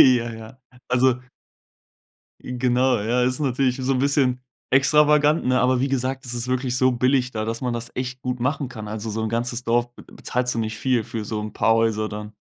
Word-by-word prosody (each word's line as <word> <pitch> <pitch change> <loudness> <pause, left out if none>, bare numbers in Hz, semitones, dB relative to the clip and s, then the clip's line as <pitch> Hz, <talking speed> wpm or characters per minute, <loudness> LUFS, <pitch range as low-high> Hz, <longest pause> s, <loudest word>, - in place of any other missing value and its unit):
Ja, 120 -3 +5
ja, 110 +3 -11 0.3
also 125 0 +3 1.2
I 125 0 -6
genau, 125 +1 +2
ja, 120 +4 +1
ist 125 +3 0
natürlich 130 -2 +1
so 135 0 -1
'n 130 - 0
bisschen 135 -2 +2 0.3
extravagant, 150 +3 +4
ne? 130 0 +2
Aber 130 0 +2
wie 135 - +1
gesagt, 130 0 -2
es 120 -1 -5
ist 120 +1 -4
wirklich 130 -1 -1
so 130 0 +3
billig 125 +1 +1
da, 110 -3 -3
dass 115 +1 -3
man 125 -2 -1
das 120 0 -5
echt 125 0 -4
gut 125 -1 -3
machen 140 +2 -1
kann. 110 -4 -8
Also, 110 +1 -5
so 110 +1 -3
'n 110 - -1
ganzes 120 +1 -2
Dorf 120 +1 0
be - - -13
bezahlst 125 0 -3
du - - -2
nicht 110 -1 -3
viel 125 -4 +1
für 115 -2 -5
so 105 0 -3
'n 105 0 -6
paar 115 - +3
Häuser 110 -1 +1
dann. 105 0 -7
125 Hz, 215 wpm, -23 LUFS, 115-130 Hz, 1.2 s, Ja